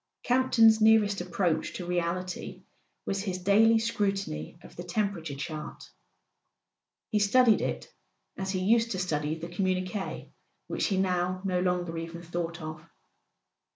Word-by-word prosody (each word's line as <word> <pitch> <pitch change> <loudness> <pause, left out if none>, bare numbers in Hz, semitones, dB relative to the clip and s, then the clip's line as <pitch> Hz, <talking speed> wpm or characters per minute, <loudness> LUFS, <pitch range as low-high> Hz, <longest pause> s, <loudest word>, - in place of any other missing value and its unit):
Campton's 240 -3 +4
nearest 215 -3 +4
approach 175 -3 -1
to 180 - -5
reality 180 +1 -3 0.4
was 195 0 -1
his 190 -3 -3
daily 210 +5 +4
scrutiny 195 - -2
of - - -14
the - - -6
temperature 175 -5 -2
chart. 150 +2 -7 1.2
He 210 - +2
studied 225 +2 +4
it - - -4 0.4
as 190 0 -4
he 190 -1 -1
used 230 +4 +3
to - - -3
study 155 -4 -1
the 165 +1 -6
communiques 185 +2 -3 0.3
which - - -1
he 195 - 0
now 185 0 0
no 180 -2 +1
longer 180 -2 -1
even 165 +1 -7
thought 170 0 -4
of. 155 0 -7
185 Hz, 135 wpm, -28 LUFS, 170-205 Hz, 1.2 s, Campton's